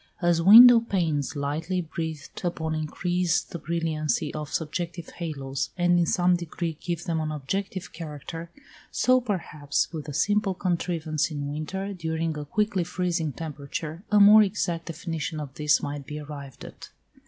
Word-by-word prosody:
As 175 -2 +2
window 230 +6 +10
panes 165 - -1
lightly 155 +6 -2
breathed 160 -2 -5
upon 160 -2 -2
increase 175 +2 0
the 175 -2 -8
brilliancy 155 -1 -1
of 150 -1 -5
subjective 170 +1 -3
halos, 140 -5 -4
and 175 0 +3
in 170 - +2
some 180 +2 +3
degree 170 -1 -4
give 175 -1 -3
them 165 -2 -1
an 155 -1 -2
objective 185 +6 -4
character, 165 +1 -7 0.4
so, 255 0 +3
perhaps, 160 - -2
with 155 -2 -6
a 145 - -5
simple 205 +2 +1
contrivance 170 -4 -1
in 145 -2 -4
winter, 190 +7 -4
during 160 -2 -2
a 150 -1 -5
quickly 205 +3 0
freezing 175 -3 -1
temperature, 155 +2 -6
a 210 - +5
more 210 +2 +9
exact 190 -5 -1
definition 160 -1 -4
of 145 -3 -6
this 150 +2 +2
might 145 -1 -5
be 150 +1 -5
arrived 140 -3 -9
at. - - -11
165 Hz, 155 wpm, -26 LUFS, 150-180 Hz, 0.4 s, window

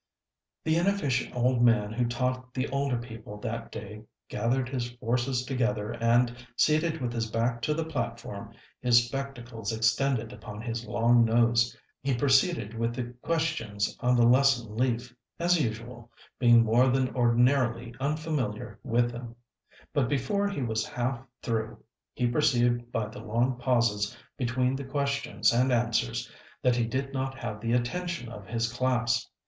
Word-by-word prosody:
The 160 +1 +2
inefficient 170 -11 0
old 125 0 +2
man 115 -3 +3
who 120 +1 0
taught 125 +1 -2
the 130 - 0
older 140 -2 0
people 115 -3 -8
that - - -4
day 105 0 -8 0.3
gathered 125 +2 0
his 125 -2 -3
forces 125 +2 -1
together 125 -5 -1
and, 120 +1 +2 0.2
seated 155 +3 +2
with 120 -3 -2
his 115 -1 -2
back 115 +2 0
to 150 +6 0
the 165 0 -1
platform, 160 -3 -5 0.3
his 120 -1 +5
spectacles 120 -4 -5
extended 115 +2 +1
upon 105 -4 -9
his 115 +1 -4
long 120 +1 +4
nose, 115 +1 +3 0.2
he 135 -2 0
proceeded 135 - +2
with 115 +1 -1
the 120 -1 -4
questions 155 -12 -1
on 125 0 +2
the 120 -1 +5
lesson 125 -3 +3
leaf, 120 0 -1 0.2
as 175 0 +3
usual, 120 0 -5 0.3
being 120 -2 +6
more 115 +3 +4
than 130 0 +1
ordinarily 120 -1 +2
unfamiliar 135 -7 -2
with 120 -1 +1
them; 120 -1 -8 0.6
but 140 -5 +1
before 145 +10 0
he 180 -10 -3
was 110 -2 0
half 120 0 -2 0.2
through 110 -2 -2 0.4
he 125 - 0
perceived 120 -2 +2
by 110 -2 -1
the 110 +2 -9
long 120 +3 0
pauses 120 -4 +1 0.2
between 125 0 0
the 140 - -4
questions 140 -1 0
and 125 +2 +3
answers 115 - 0 0.4
that 125 -1 +4
he 120 -1 +1
did 135 +4 -3
not 135 0 -2
have 105 -4 -5
the 115 +1 0
attention 125 +3 -1
of 105 -4 -10
his 115 0 -1
class. 125 -1 +1
120 Hz, 155 wpm, -28 LUFS, 115-130 Hz, 0.6 s, being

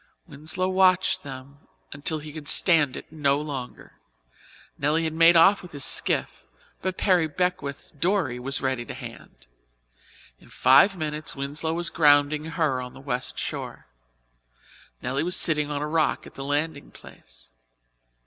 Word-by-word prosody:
Winslow 155 +6 -3
watched 185 0 +3
them 140 0 -10 0.3
until 145 +3 -3
he 150 0 -9
could 150 -2 -8
stand 150 -8 +3
it - - -11
no 145 -3 +1
longer. 140 -5 -8 0.8
Nelly 150 +3 0
had 160 -1 -2
made 165 +1 +6
off 195 +5 +5
with 180 -3 -13
his 140 -2 -2
skiff, - - 0 0.3
but 185 0 -3
Perry 180 -5 +2
Beckwith's 155 -4 -3
dory 160 -5 -1
was 135 +2 -4
ready 130 -2 -1
to - - -8
hand. - - -11 0.9
In - - -20
five 140 +10 +5
minutes, 155 -1 -3
Winslow 150 +4 -3
was 170 0 -2
grounding 145 -1 +3
her 155 -5 -1
on 125 0 -8
the - - -11
West 130 -2 -4
shore. - - -5 1.2
Nelly 135 +2 -1
was 180 +3 0
sitting 150 -3 +2
on 145 0 -3
a - - -2
rock 155 0 0
at - - -13
the 135 - -7
landing 145 +1 -2
place. - - -17
150 Hz, 150 wpm, -25 LUFS, 140-165 Hz, 1.2 s, made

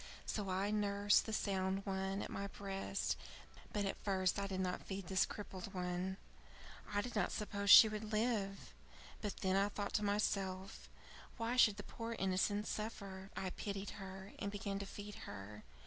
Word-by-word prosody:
So 205 -3 -2
I 190 +3 +1
nursed 205 0 +3
the - - -2
sound 195 -2 0
one 195 0 -1
at - - -6
my 200 0 -3
breast, 195 - -2 0.6
but 205 -1 0
at 195 - -3
first 190 -1 +2
I 200 - -1
did 190 -1 -3
not 185 -1 -1
feed 195 -1 -5
this 190 +1 +3
crippled 195 -2 -7
one. 180 +1 -1 0.7
I 205 0 +2
did 240 +1 -6
not 205 -4 +2
suppose 200 -1 -2
she 220 - +12
would 215 0 -4
live. 215 - 0 0.5
But 205 - -3
then 190 0 +2
I 200 +1 +3
thought 205 0 -3
to 210 - +2
myself, 195 -2 -1 0.5
why 230 +1 0
should 215 -5 +6
the 205 - -5
poor 230 +2 -5
innocent 195 +2 +1
suffer? 195 -3 -4
I 185 -1 -2
pitied 200 0 -4
her, 190 +1 -8
and 200 - -1
began 200 -1 -3
to 200 - -4
feed 205 +1 -7 0.2
her. 100 +1 -8
200 Hz, 175 wpm, -38 LUFS, 190-205 Hz, 0.7 s, she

